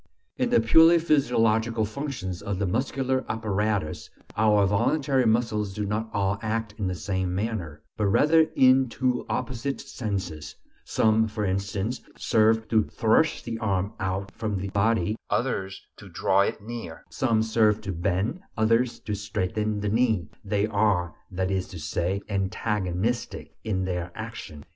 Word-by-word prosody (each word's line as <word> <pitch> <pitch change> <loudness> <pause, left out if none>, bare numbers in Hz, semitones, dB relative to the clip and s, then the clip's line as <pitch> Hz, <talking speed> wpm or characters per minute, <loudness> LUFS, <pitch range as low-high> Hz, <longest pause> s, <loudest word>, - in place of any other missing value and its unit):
In - - 0
the - - +4
purely 160 +9 +6
physiological 115 -8 +2
functions 110 - -5
of 100 -2 -3
the 100 - 0
muscular 130 +5 0
apparatus, 105 -5 -1 0.3
our 105 -2 +4
voluntary 130 +5 +2
muscles 110 -3 0
do 105 - -2
not 105 +2 -2
all 100 0 0
act 110 -1 -2
in 100 - -1
the 90 - -2
same 95 +1 -2
manner, 95 -8 -3
but 105 - +1
rather 155 +10 +4
in 130 0 +5
two 125 +1 -1
opposite 130 +2 -2
senses; 95 - -5 0.3
some, 110 0 +2
for 105 -1 -3
instance, 100 +5 -2 0.2
serve 110 0 +2
to 110 -1 +4
thrust 115 +8 +1
the 115 -1 -4
arm 100 -2 -1
out 95 +1 -2
from 110 -3 -3
the 100 +1 -4
body, 105 0 +1
others 95 -7 -2
to - - -12
draw 95 - +1
it 100 +1 -1
near; 115 -7 -7
some 115 -4 +1
serve 110 -1 +3
to 95 - -4
bend, 95 - -1 0.2
others 115 +2 +2
to 105 - -4
straighten 105 +1 -2
the 105 - -1
knee; 110 -6 +1 0.2
they 100 0 0
are, 100 -6 +1 0.2
that 95 0 -2
is 95 -1 -1
to 90 - -9
say, 85 +5 -2
"antagonistic" 100 +2 -2
in 95 -4 -1
their 90 -1 -3
action. 110 -10 -8
105 Hz, 150 wpm, -26 LUFS, 95-115 Hz, 0.3 s, purely